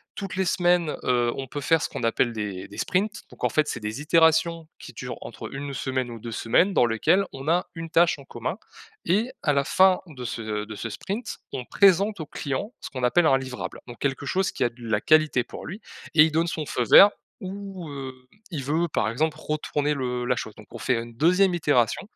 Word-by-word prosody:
Toutes 195 -4 -5
les 190 0 0
semaines, 175 -3 +2
heu, 120 -1 +2
on 135 - -4
peut 145 +3 -5
faire 160 +3 +3
ce - - -1
qu'on - - -6
appelle 115 +1 +1
des 100 -4 -5
des 100 - -13
sprints. 210 +4 -1
Donc, - - -15
en - - +3
fait, 155 -1 +1
c'est - - -3
des 105 +5 -5
itérations 160 +1 +3
qui - - -11
durent - - -6
entre - - -8
1 140 +1 -5
semaine 130 -1 -2
ou 115 - -8
2 115 +1 -7
semaines, 170 - +2
dans 125 - +4
lesquelles 120 - +2
on 135 +2 -8
a 175 +3 +2
une 165 0 -6
tâche 170 0 +4
en - - -11
commun 120 - -4 0.5
et 215 +8 +1
à 145 - +3
la 140 0 +2
fin 185 +5 +4
de 135 -6 -9
ce 115 - -4 0.2
de 110 0 -8
ce 115 +3 -5
sprint, 205 - -5 0.2
on 125 - -3
présente 200 - +3
au 155 - -4
client 145 - -4
ce - - -6
qu'on 130 -2 -6
appelle 160 +8 +4
un 135 - +5
livrable. 130 -2 -6
Donc, 120 - -10
quelque 140 0 -2
chose 190 +6 0
qui - - -2
a - - +2
de 120 - -26
la 110 -3 0
qualité 155 -5 +4
pour - - -10
lui 190 +7 -7 0.4
et 155 - +9
il 160 - +2
donne 165 +2 +2
son 160 -2 -3
feu 125 - -1
vert 200 - +10 0.3
ou, 195 -2 -7
heu, 135 -2 -6 0.4
il 145 -6 -4
veut, 165 +4 0
par 110 - 0
exemple, 155 +7 -1
retourner 150 -1 -1
le 125 -3 -2
la 125 +1 +1
chose. 110 - -5
Donc, 105 - -14
on - - -8
fait 125 -3 0
une 115 0 -10
2e 180 +7 +4
itération 145 -9 +2
150 Hz, 230 wpm, -25 LUFS, 125-175 Hz, 0.5 s, vert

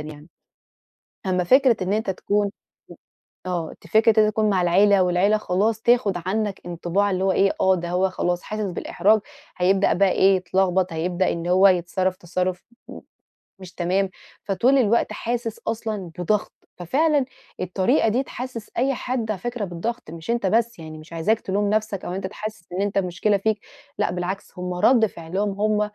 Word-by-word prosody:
يعني. 150 +1 -10 1.0
أمَّا 180 -1 +1
فكرة 255 +4 +4
إن 185 +2 -1
أنتَ 215 -1 -1
تكون 205 +2 0 1.0
آه، 175 -3 -3
دي - - -14
فكرة 220 +3 +4
إن - - +6
أنتَ 215 - +1
تكون 215 0 +1
مع 190 -2 +2
العيلة، 195 +3 +4
والعيلة 180 +4 +3
خلاص 210 +2 0
تاخُد 235 -5 +3
عنك 205 0 -1
انطباع 175 +4 0
اللي 185 0 -1
هو 190 - +3
إيه، 195 +1 +3
آه، 190 0 +4
ده 175 -1 -4
هو 185 +2 +1
خلاص، 175 -1 -1
حاسس 215 0 -4
بالإحراج، 200 +4 +2 0.4
هيبدأ 190 +2 +3
بقى 195 +1 +3
إيه، 195 0 +4
يتلغبط، 185 0 0
هيبدأ 175 +3 0
إن 170 0 -5
هو 185 +2 +6
يتصرَّف 185 +1 0
تصرُّف 180 0 -3 0.2
م - - -9 0.6
مش 185 -1 -11
تمام، 185 +2 0 0.3
فطول 230 +8 +2
الوقت 235 -2 +2
حاسس 235 -1 -3
أصلًا 215 -5 -3
بضغط. 205 +4 0 0.3
ففعلًا 285 - +1 0.3
الطريقة 190 - +1
دي 245 +5 +1
تحسس 250 -4 -7
أي 270 +3 +2
حد 245 -3 -2
على 195 - -4
فكرة 240 0 -3
بالضغط، 185 +2 -5
مش 165 +6 -5
أنتَ 235 -3 -1
بس 230 +1 +1
يعني، 155 -1 -9
مش 155 +2 -13
عايزاك 170 +7 +1
تلوم 200 +1 -1
نفسك، 215 -2 -1
أو 180 - -4
أنتَ 190 0 -3
تحس 215 -1 -7
إن 185 - -1
أنتَ 200 0 -1
المشكلة 195 +2 +1
فيك. 215 +2 0 0.4
لأ، - - 0
بالعكس، 180 +3 -4
هُم 180 0 -3
رد 225 +6 +4
فعلهم 190 +2 -3
هُم 215 0 +2
195 Hz, 175 wpm, -23 LUFS, 180-215 Hz, 1.0 s, إن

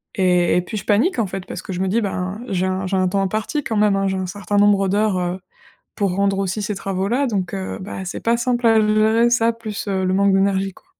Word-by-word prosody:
Et 180 -4 +3
et - - +2
puis 200 +5 -8
je 195 - -5
panique, 235 - +2
en 220 - +1
fait, 190 0 -6
parce - - -7
que - - -8
je 180 - -4
me 190 - 0
dis: 220 +5 +1
«Ben, 195 0 -3
j'ai 185 -2 0
un 190 0 -2
j'ai 190 +1 -1
un 185 0 +2
temps 195 +2 0
imparti, 215 - -2
quand 225 -4 -2
même, 210 -1 +3
hein, 195 0 0
j'ai 190 0 -1
un 185 - -2
certain 205 +2 -3
nombre 200 -1 +4
d'heures, 205 0 +1
heu, 180 +1 -2 0.6
pour 200 -3 0
rendre 195 0 +1
aussi 195 +2 -2
ces 205 0 -3
travaux-là». 195 +8 -1
Donc, 200 -6 -2
heu, 190 -1 -4
bah 190 0 -6
c'est 175 - -5
pas 230 +1 +2
simple 240 0 0
à 225 0 +5
le 215 0 +2
gérer, 220 +2 +3
ça, 230 -1 +3
plus, 220 -3 -6
heu, 190 -1 0
le 185 0 +1
manque 200 0 +3
d'énergie, 195 0 +1
quoi. - - -21
195 Hz, 265 wpm, -20 LUFS, 190-215 Hz, 0.6 s, à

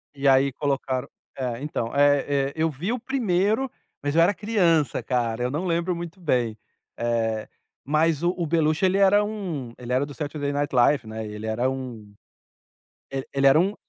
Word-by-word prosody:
E 140 0 0
aí 135 +1 +5
colocaram 135 -2 -1 0.3
É, 125 -2 -3
então, 140 -6 -3
eh, 145 -1 +3
eh, - - -12
eu 160 0 +1
vi 160 +8 -3
o 245 - 0
primeiro, 225 -1 +1 0.3
mas 145 +1 -1
eu 165 - +6
era 175 +4 +4
criança, 175 - +1
cara, 120 -2 -1
eu 125 - -1
não 155 +6 -2
lembro 170 +1 0
muito 170 +2 -7
bem. 125 -9 0 0.4
Eh, 115 -2 -1 0.4
mas 155 +2 +2
o 175 +1 +2
o 170 -2 -1
Beluch 160 +2 +1
ele 190 +1 +3
era 200 +1 +5
um 185 - -4
ele 125 0 -5
era 130 +2 +2
do 145 - -9
Saturday 145 -1 -3
Night 145 0 -2
Live, 125 +1 +4
né, 110 0 -5
e 105 - -7
ele 105 +1 -7
era 115 +4 0
um 125 -6 -6 1.0
e 135 -1 -3
ele 140 0 +3
era 135 +3 +7
um 190 +5 +2
145 Hz, 190 wpm, -25 LUFS, 125-170 Hz, 1.0 s, era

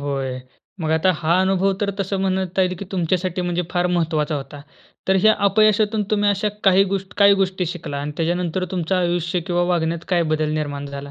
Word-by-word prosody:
होय. 135 -2 -3 0.4
मग 160 -1 -1
आता 185 +4 +3
हा 170 +3 +2
अनुभव 190 +1 +2
तर 200 -1 0
तसं 195 0 -2
म्हणता 190 0 0
येईल 185 0 0
की 200 - -6
तुमच्यासाठी 180 0 -1
म्हणजे 175 0 -1
फार 175 0 +1
महत्वाचा 155 -2 0
होता. 140 +1 -8 0.5
तर 190 - +4
ह्या 215 +2 +5
अपयशातून 215 +1 +3
तुम्ही 205 -1 +2
अशा 200 +1 0 0.2
काही 195 0 +5
गोष्ट 195 -1 -5
काय 200 0 +7
गोष्टी 185 -1 -1
शिकला 160 -5 -5
आणि 145 +1 -4
त्याच्यानंतर 175 +2 -1
तुमचं 185 0 -1
आयुष्य 175 0 0
किंवा 175 -1 +1
वागण्यात 165 0 -2
काय 175 -2 +2
बदल 155 -1 0
निर्माण 145 -2 -3
झाला? 140 0 -8
180 Hz, 190 wpm, -21 LUFS, 160-190 Hz, 0.5 s, काय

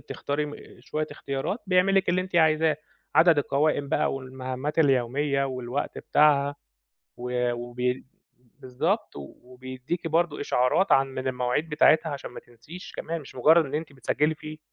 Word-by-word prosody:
بتختاري 145 +1 -3
م 145 - -8 0.2
شوية 155 0 -3
اختيارات 140 - -3
بيعمل 185 +1 +3
لِك 195 -1 +2
اللي 180 +1 +2
أنتِ 185 -1 -4
عايزاه، 160 -1 +3 0.4
عدد 165 -2 +6
القوائم 145 0 +1
بقى - - +1
والمهمات 130 +3 -5
اليومية 140 0 +2
والوقت 130 0 -4
بتاعها 145 -1 +3 0.6
و 125 0 -1
وبي 120 +1 -3 0.5
بالضبط 125 -1 -2
و 70 -1 -9
وبيدّيكِ 130 +6 -6
برضه 165 -1 0
إشعارات 145 +8 +2
عن 135 0 +5
من 130 0 -6
المواعيد 125 +5 -1
بتاعتها 155 +1 +4
عشان 140 -1 -6
ما - - -9
تنسيش 120 +10 -12
كمان 165 0 -4
مش 140 - -13
مُجرّد 160 +6 +5
إن 135 - -7
أنتِ 155 -1 -3
بتسجّلي 150 +3 0
فيه. 155 0 -9
145 Hz, 150 wpm, -26 LUFS, 130-160 Hz, 0.6 s, عدد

